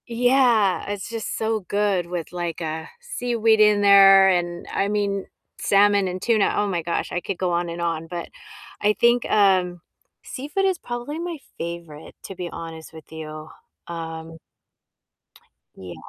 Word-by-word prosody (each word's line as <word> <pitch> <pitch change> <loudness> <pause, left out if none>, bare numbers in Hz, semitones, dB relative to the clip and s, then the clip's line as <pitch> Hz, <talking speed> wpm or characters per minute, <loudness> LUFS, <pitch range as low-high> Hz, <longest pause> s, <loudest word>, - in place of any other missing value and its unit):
Yeah, 240 -5 +2
it's 205 0 -5
just 225 -1 -4
so 220 0 0
good 195 -2 0
with, 175 -2 -5
like, 175 -2 -4
uh, 160 0 -4
seaweed 240 - +1
in 210 -1 +5
there, 195 -1 +7
and 175 -1 -1
I 195 - +1
mean, 200 -1 -1 0.3
salmon, 200 -1 +3
and 185 0 -4
tuna, 220 -3 +2
oh 205 - +1
my 180 -4 -1
gosh, 170 +1 -3
I 175 - -2
could 195 - -4
go 185 -1 -1
on 175 0 -1
and 170 +1 -6
on, 165 -1 -2
but 170 0 -6 0.5
I 210 +1 +3
think, 240 0 +3
um, 185 -4 +3 0.4
seafood 295 +9 -3
is 375 -3 +1
probably 240 +6 -5
my 340 -1 -4 0.2
favorite, 170 -2 -7
to 195 - -8
be 180 -1 -5
honest 165 -1 -8
with 160 -1 -14
you, 155 -1 -8 0.4
um 165 -1 -7 1.4
Yeah. 90 -2 -9
195 Hz, 155 wpm, -23 LUFS, 170-220 Hz, 1.4 s, there